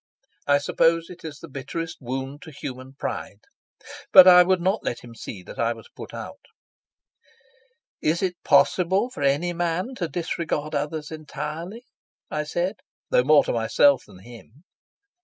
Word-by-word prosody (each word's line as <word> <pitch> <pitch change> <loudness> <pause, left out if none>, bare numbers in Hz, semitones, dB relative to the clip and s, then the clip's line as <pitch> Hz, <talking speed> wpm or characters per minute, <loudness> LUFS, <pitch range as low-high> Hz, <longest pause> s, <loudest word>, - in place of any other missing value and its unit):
I 145 0 +5
suppose 165 +4 +1
it 180 - -13
is 155 -3 -7
the 165 - -11
bitterest 150 +4 -6
wound 135 +3 -5
to - - -11
human 130 -2 -8
pride. 105 -6 -5 0.7
But 185 -1 +10
I 180 -1 +10
would 185 +1 +3
not 190 +4 0
let 120 - -3
him 120 -1 -12
see 100 -4 -8
that - - -11
I 115 0 +1
was 115 - -14
put - - -9
out. - - -8 1.6
"Is 165 +4 +1
it 180 -2 -3
possible 190 +7 +3
for - - -8
any 145 +6 +1
man 175 +7 -2
to 175 - -2
disregard 160 -1 -3
others 150 +1 -3
entirely?" 155 - -6 0.5
I 150 0 -2
said, 175 +6 -2 0.3
though 125 - +4
more 150 +2 +6
to - - -2
myself 125 +4 +3
than - - -15
to 95 - -17
him. 120 - -15
155 Hz, 160 wpm, -24 LUFS, 135-175 Hz, 1.6 s, But